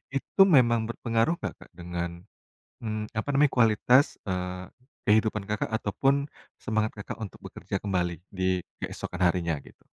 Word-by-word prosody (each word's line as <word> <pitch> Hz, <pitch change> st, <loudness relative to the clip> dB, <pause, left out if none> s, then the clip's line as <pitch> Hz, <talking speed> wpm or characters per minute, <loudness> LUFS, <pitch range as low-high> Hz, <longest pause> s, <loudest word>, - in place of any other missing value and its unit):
itu 165 Hz, +7 st, +1 dB
memang 120 Hz, -3 st, +5 dB
berpengaruh 115 Hz, +6 st, +1 dB
gak -, -, -3 dB
Kak -, -, -14 dB
dengan, 85 Hz, 0 st, -3 dB, 0.7 s
mmm, 110 Hz, -1 st, -4 dB
apa 110 Hz, -, -2 dB
namanya 145 Hz, -1 st, +4 dB
kualitas, 125 Hz, +4 st, +4 dB
eee, 90 Hz, -1 st, -3 dB, 0.4 s
kehidupan 105 Hz, -1 st, +2 dB
Kakak 105 Hz, +1 st, -2 dB
ataupun 135 Hz, +7 st, +1 dB, 0.5 s
semangat 110 Hz, -2 st, 0 dB
Kakak 105 Hz, +2 st, -7 dB
untuk 105 Hz, -, -6 dB
bekerja -, -, -5 dB
kembali 90 Hz, -3 st, 0 dB, 0.2 s
di 95 Hz, -1 st, 0 dB, 0.2 s
keesokan 90 Hz, -, -5 dB
harinya 85 Hz, -4 st, -1 dB
gitu? -, -, -19 dB
105 Hz, 140 wpm, -27 LUFS, 90-115 Hz, 0.7 s, memang